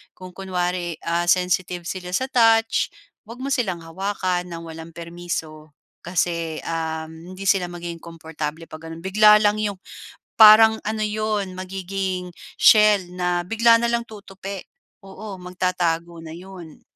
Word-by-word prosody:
Kung 185 0 -11
kunwari, 180 -2 -3
ah, 170 +1 -1
sensitive 180 0 +1
sila 180 +1 -5
sa 260 +5 -2
touch, 225 -2 +3 0.4
huwag 245 +3 -9
mo 275 - -3
silang 190 -10 -1
hawakan 185 +1 -2
ng 170 -1 -7
walang 160 0 -10
permiso. 165 -3 -6 0.2
Kasi, 170 -2 -2
um, 160 +2 -5
hindi 195 - -8
sila 185 -2 +2
magiging 175 -1 -7
komportable' 160 -1 -7
pag 160 +1 -9
ano, 165 +1 -9
bigla 210 +3 +6
lang 210 0 +3
'yong 205 -2 -1 0.6
parang 220 0 +8
ano 215 0 -2
'yon, 210 -3 -2
magiging 185 -1 -4 0.2
shell 210 -7 +6
na 180 -1 -1
bigla 230 +3 +4
na 235 - 0
lang 235 0 0
tutupi. 200 -3 -9 0.4
Oo, 195 0 -9
magtatago 175 -2 -2
na 160 -1 -9
'yon. 175 -2 -12
180 Hz, 140 wpm, -22 LUFS, 170-205 Hz, 0.6 s, parang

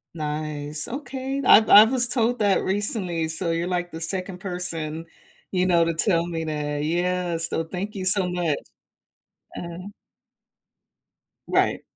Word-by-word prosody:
Nice, 150 -1 -4
okay. 270 +1 -4
I've 220 +1 +7
I 210 - +10
was 240 +1 +2
told 240 0 0
that 200 -2 +2
recently, 190 -4 -1
so 165 +2 -1
you're, 170 +1 -1
like, 175 -1 -2
the 165 - -7
2nd 180 +1 -4
person, 165 -4 -3 0.5
you 185 -1 +1
know, 170 -2 +4
to 165 - 0
tell 170 0 +1
me 165 -2 -4
that. 150 -1 -3
Yeah, 175 +1 -1
so 165 0 -1
thank 185 +5 -5
you 190 - -4
so 190 0 +3
much. 175 -5 -1 1.0
Uh-huh. 175 +2 -7 1.6
Right. - - +1
175 Hz, 140 wpm, -24 LUFS, 165-195 Hz, 1.6 s, I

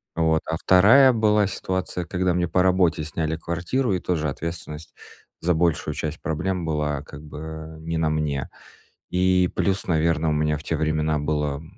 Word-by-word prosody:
Вот. 80 -1 +2
А 80 - -1
2 115 - +6
была 105 -2 +3
ситуация, 95 -2 -3
когда 90 0 0
мне 85 0 0
по 90 +2 +2
работе 90 -4 +2
сняли 80 +1 -2
квартиру, 90 +9 -1
и 90 - 0
тоже 80 -4 -1
ответственность 80 +1 -6 0.5
за 90 +1 +2
большую 85 -1 0
часть 80 0 -4
проблем 85 +3 -2
была 75 -2 -1
как 75 0 -11
бы 80 +1 -8
не 80 0 -3
на 80 -1 +1
мне. 75 -3 -2 0.6
И 90 0 +3
плюс, 100 0 0
наверно, 80 -1 +1
у - - +1
меня 75 0 0
в 75 - -12
те 80 - -1
времена 75 0 0
было 75 0 -2
80 Hz, 170 wpm, -24 LUFS, 75-90 Hz, 0.6 s, 2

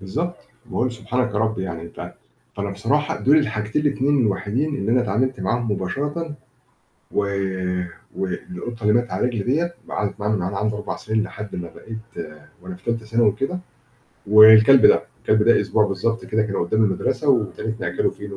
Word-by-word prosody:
بالضبط. 155 - -3 0.3
باقول 125 +1 -1
سُبحانك 125 +1 -2
يا - - +1
رب 110 -1 0
يعني 90 -3 -4
أنت 85 - -9 0.4
فانا 100 0 -3
بصراحة 145 +10 -1
دول 145 +4 +5
الحاجتين 110 -2 -1
ال2 145 0 +2
الوحيدين 115 +7 0
اللي 110 -4 -1
انا 125 - +4
اتعاملت 125 +2 -1
معاهم 115 +4 -1
مباشرةً. 145 - -3 0.8
و - - 0 1.0
والقطة 120 - -5
اللي 105 0 +3
ماتت 120 +1 +1
على - - 0
رجلي 115 -5 -3
ديّة 165 +7 0 0.2
قعدت 105 -1 -3
معانا 105 +1 0
من 95 - -2
وأنا 95 +2 -3
عندي 105 +1 -1
4 105 0 -4
سنين 110 0 -1
لحد 105 0 -7
ما 85 -1 -6
بقيت 110 -6 -8 0.3
وأنا 185 - -8
في 180 - -20
تالتة 115 -1 -2
ثانوي 115 -1 +3
كده. 135 - -3 0.7
والكلب 110 +5 +8
ده. - - +5 0.2
الكلب 110 0 +3
ده 115 +2 +5
أسبوع 105 -1 +2
بالضبط 115 +4 -2
كده، 110 0 0
كان 105 -2 -3
قدام 110 +6 +1
المدرسة 105 +9 -1
وابتديت 110 -2 0
نأكله - - 0
فينو 100 -1 -9
110 Hz, 175 wpm, -22 LUFS, 105-130 Hz, 1.0 s, والكلب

